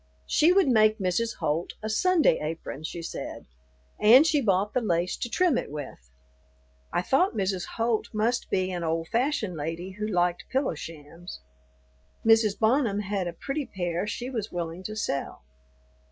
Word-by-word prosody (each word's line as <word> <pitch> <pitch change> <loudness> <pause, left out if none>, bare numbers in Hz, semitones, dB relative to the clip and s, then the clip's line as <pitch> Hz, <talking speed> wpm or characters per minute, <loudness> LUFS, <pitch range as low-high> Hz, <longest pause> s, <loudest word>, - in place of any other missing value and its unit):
She 320 - +4
would 380 -2 +4
make 215 -3 +4
Mrs. 205 +4 -1
Holt 160 +4 -2
a - - -2
"Sunday 325 - +3
apron," 155 -1 -5
she 170 +1 -5
said, - - -6 0.6
and 245 +8 +8
she 305 -3 +2
bought 200 -2 +1
the 255 - +1
lace 175 -4 0
to 240 - -4
trim 335 +2 +2
it - - -6
with. 140 - -8 0.8
I 175 - 0
thought 315 - +2
Mrs. 190 -2 -1
Holt 230 -1 0
must 230 +3 0
be 185 0 0
an 175 -2 -3
old 165 0 -2
fashioned 235 - 0
lady 165 +5 -4
who 215 - -1
liked 175 -3 0
pillow 265 -4 0
shams. 160 - -10 0.8
Mrs. 220 -2 +4
Bonham 220 -2 +2
had 195 -2 -2
a 170 - -4
pretty 275 - -4
pair 175 0 -3
she 245 +4 -4
was 220 -4 -4
willing 170 0 -4
to 215 - -5
sell. 140 - -3
205 Hz, 165 wpm, -27 LUFS, 170-235 Hz, 0.8 s, and